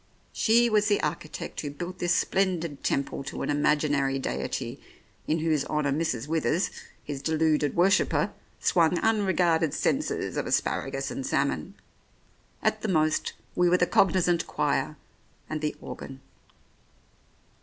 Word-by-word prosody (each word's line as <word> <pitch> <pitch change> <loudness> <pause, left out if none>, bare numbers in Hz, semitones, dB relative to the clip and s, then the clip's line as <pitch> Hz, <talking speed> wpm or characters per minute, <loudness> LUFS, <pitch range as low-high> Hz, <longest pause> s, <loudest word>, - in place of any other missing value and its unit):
She 235 +2 +4
was 210 -2 +3
the 205 -2 +3
architect 150 0 -4
who 145 - -4
built 175 +5 -7
this 175 0 +2
splendid 170 -7 0
temple 140 0 -1
to - - -5
an - - -1
imaginary 145 -2 +2
deity 135 - -3 0.5
in 155 - +2
whose 155 -3 +1
honour 150 -2 0
Mrs. 140 -5 -1
Withers, 160 +2 0 0.3
his 140 -2 -5
deluded 155 -1 +1
worshipper, 185 +3 +3 0.3
swung 170 0 +3
unregarded 180 -7 +2
censers 290 +3 -1
of - - -1
asparagus - - -1
and - - -4
salmon; - - -1 0.9
at - - +1
the - - -2
most 155 -5 +1 0.2
we 180 0 +4
were 180 - +4
the 180 - +3
cognisant 175 -2 +2
choir - - 0 0.5
and 155 -1 -4
the 150 -1 -1
organ. 135 0 -8
160 Hz, 135 wpm, -27 LUFS, 150-180 Hz, 0.9 s, She